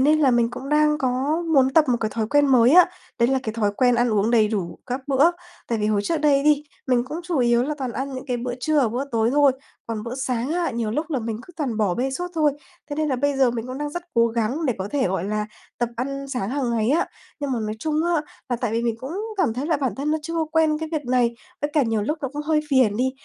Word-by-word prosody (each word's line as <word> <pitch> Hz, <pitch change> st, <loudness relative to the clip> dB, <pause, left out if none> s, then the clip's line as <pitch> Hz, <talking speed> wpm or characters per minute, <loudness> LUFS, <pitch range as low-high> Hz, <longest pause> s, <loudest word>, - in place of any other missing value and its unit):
nên 300 Hz, +3 st, +4 dB
là 275 Hz, -, +5 dB
mình 235 Hz, -1 st, +2 dB
cũng 270 Hz, -, -7 dB
đang 300 Hz, 0 st, +3 dB
có 270 Hz, +5 st, 0 dB
muốn 265 Hz, -1 st, +5 dB
tập 320 Hz, -2 st, +6 dB
một 245 Hz, -, +3 dB
cái 215 Hz, -1 st, -1 dB
thói 220 Hz, -2 st, 0 dB
quen 290 Hz, +2 st, +4 dB
mới 250 Hz, -3 st, +5 dB
á, 360 Hz, +1 st, +8 dB, 0.3 s
đấy 235 Hz, -, +4 dB
là 265 Hz, 0 st, +2 dB
cái 220 Hz, -, -3 dB
thói 215 Hz, -3 st, 0 dB
quen 250 Hz, -2 st, +4 dB
ăn 240 Hz, +1 st, +2 dB
uống 210 Hz, +1 st, +2 dB
đầy 220 Hz, -3 st, +4 dB
đủ 195 Hz, -6 st, -3 dB
các 250 Hz, +2 st, -3 dB
bữa. 280 Hz, +5 st, +5 dB, 0.4 s
Tại 230 Hz, -, 0 dB
vì 210 Hz, -, 0 dB
hồi 210 Hz, -1 st, +2 dB
trước 335 Hz, -, 0 dB
đây 285 Hz, -2 st, +3 dB
đi, 300 Hz, -1 st, +4 dB, 0.2 s
mình 250 Hz, -2 st, +2 dB
cũng 300 Hz, +6 st, -5 dB
chủ 345 Hz, -3 st, -2 dB
yếu 240 Hz, -1 st, +3 dB
là 300 Hz, +4 st, -2 dB
toàn 255 Hz, -3 st, -3 dB
ăn 270 Hz, +1 st, -4 dB
những 260 Hz, +2 st, -7 dB
cái 250 Hz, -, -1 dB
bữa 245 Hz, +1 st, -3 dB
trưa 305 Hz, +3 st, +2 dB
và 250 Hz, -, +2 dB
bữa 245 Hz, +5 st, -2 dB
tối 225 Hz, 0 st, +2 dB
thôi, 285 Hz, -1 st, +5 dB, 0.3 s
còn 225 Hz, -2 st, -4 dB
bữa 235 Hz, +3 st, -5 dB
sáng 255 Hz, +1 st, -2 dB
á, 345 Hz, 0 st, 0 dB
nhiều 230 Hz, -3 st, -2 dB
lúc 305 Hz, +7 st, -2 dB
là 275 Hz, -, 0 dB
mình 225 Hz, -2 st, -3 dB
cứ 355 Hz, -, -15 dB
toàn 265 Hz, -8 st, -2 dB
bỏ 200 Hz, -5 st, +1 dB
bê 265 Hz, +2 st, -1 dB
suốt 355 Hz, +7 st, -3 dB
thôi. 305 Hz, -3 st, +3 dB, 0.4 s
Thế 290 Hz, -, -3 dB
nên 310 Hz, -1 st, 0 dB
là 260 Hz, -, 0 dB
bây 285 Hz, +2 st, 0 dB
giờ 265 Hz, -2 st, +4 dB
mình 235 Hz, 0 st, -4 dB
cũng 255 Hz, +1 st, -6 dB
đang 295 Hz, 0 st, -3 dB
rất 350 Hz, +3 st, -5 dB
cố 235 Hz, 0 st, +5 dB
gắng 235 Hz, +7 st, -1 dB
để 250 Hz, -, +1 dB
có 190 Hz, +2 st, -3 dB
thể, 270 Hz, -10 st, +1 dB
gọi 185 Hz, -1 st, -1 dB
là, 210 Hz, +1 st, -2 dB, 0.3 s
tập 240 Hz, -1 st, 0 dB
ăn 275 Hz, +3 st, -3 dB
sáng 250 Hz, -6 st, -3 dB
hàng 265 Hz, -2 st, -1 dB
ngày 230 Hz, +1 st, +1 dB
á. 320 Hz, -, +2 dB, 0.3 s
Nhưng 285 Hz, -2 st, -2 dB
mà 245 Hz, -, 0 dB
nói 215 Hz, 0 st, -3 dB
chung 310 Hz, +6 st, -2 dB
á, 340 Hz, -3 st, +1 dB, 0.3 s
là 245 Hz, -, 0 dB
tại 230 Hz, -2 st, -2 dB
vì 230 Hz, -, 0 dB
mình 235 Hz, -1 st, 0 dB
cũng 265 Hz, +5 st, -6 dB, 0.2 s
cảm 315 Hz, -, +1 dB
thấy 260 Hz, +5 st, -3 dB
là 325 Hz, -1 st, +2 dB
bản 270 Hz, -4 st, -1 dB
thân 285 Hz, +3 st, -2 dB
nó 315 Hz, -, +1 dB
chưa 330 Hz, +2 st, -5 dB
có 325 Hz, -1 st, +1 dB
quen 315 Hz, -1 st, +3 dB
cái 320 Hz, 0 st, -4 dB
việc 305 Hz, -2 st, -2 dB
này, 245 Hz, -2 st, +2 dB, 0.3 s
với 290 Hz, -, -1 dB
cả 300 Hz, -, +4 dB
nhiều 225 Hz, -3 st, 0 dB
lúc 300 Hz, +9 st, -2 dB
nó 270 Hz, -, -1 dB
cũng 295 Hz, 0 st, -4 dB
hơi 305 Hz, 0 st, +2 dB
phiền 255 Hz, -7 st, +3 dB
đi. 255 Hz, +3 st, +1 dB
260 Hz, 290 wpm, -23 LUFS, 235-295 Hz, 0.4 s, á